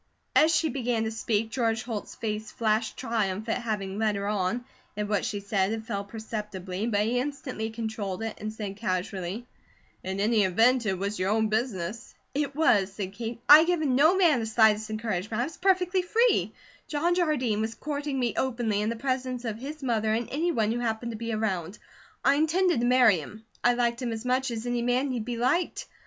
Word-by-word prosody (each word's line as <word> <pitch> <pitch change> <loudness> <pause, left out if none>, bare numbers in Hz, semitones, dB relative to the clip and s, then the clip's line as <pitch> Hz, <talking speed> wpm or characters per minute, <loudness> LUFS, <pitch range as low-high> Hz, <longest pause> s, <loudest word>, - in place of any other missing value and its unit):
As 315 +1 +6
she 325 0 +2
began 240 -3 -1
to 220 - -2
speak, 225 0 -1
George 225 -2 0
Holt's 225 -4 -5
face 215 -1 -4
flashed 220 0 0
triumph 220 -4 -1
at 230 +2 -1
having 205 -3 -3
led 215 -2 +1
her 200 0 -3
on; 210 +4 -1 0.3
at 210 0 -1
what 205 -2 0
she 205 - -2
said 200 -1 0
it 220 0 -5
fell 200 -2 -3
perceptibly, 210 -2 -5
but 205 -3 +1
he 235 +4 +1
instantly 260 -5 -4
controlled 220 -3 -4
it 225 -1 -4
and 215 +1 -4
said 205 -3 -6
casually: 190 +1 -3 0.6
"In 190 +1 -3
any 215 +1 +3
event, 230 +6 +3
it 190 -2 0
was 200 +3 -3
your 185 +1 +1
own 220 +1 +2
business." 220 -1 -3 0.2
"It 280 -1 -1
was," 205 -11 +3
said 195 -1 -5
Kate. 230 +2 -6
"I 295 +1 +11
had 325 - +3
given 315 -7 +1
no 310 +7 +5
man 335 -9 +4
the 225 - -3
slightest 220 -1 +3
encouragement, 215 0 -2
I - - +1
was 320 +3 -9
perfectly 370 -1 +2
free. 460 +7 +2 0.4
John 325 +4 +1
Jardine 280 -11 +1
was 220 +1 -3
courting 290 -2 -3
me 240 -2 0
openly 235 -5 0
in 210 - 0
the 230 - -2
presence 255 0 -2
of 220 -1 -3
his 290 +3 -7
mother 220 -4 +1
and 235 +1 -2
any 330 +5 0
one 220 -7 +1
who 240 - -1
happened 235 0 -2
to - - -6
be 230 +1 -4
around. 195 -4 -2 0.5
I 280 - +5
intended 335 0 +2
to 240 - +1
marry 245 -7 +5
him. 215 +9 -10 0.2
I 245 0 +4
liked 235 0 0
him 245 -2 -2
as 225 +1 -5
much 255 +1 +1
as 230 -1 -4
any 245 -1 -1
man 250 +3 +1
need 235 -4 -3
be 240 -1 -3
liked. 265 +9 0
225 Hz, 205 wpm, -27 LUFS, 210-255 Hz, 0.6 s, I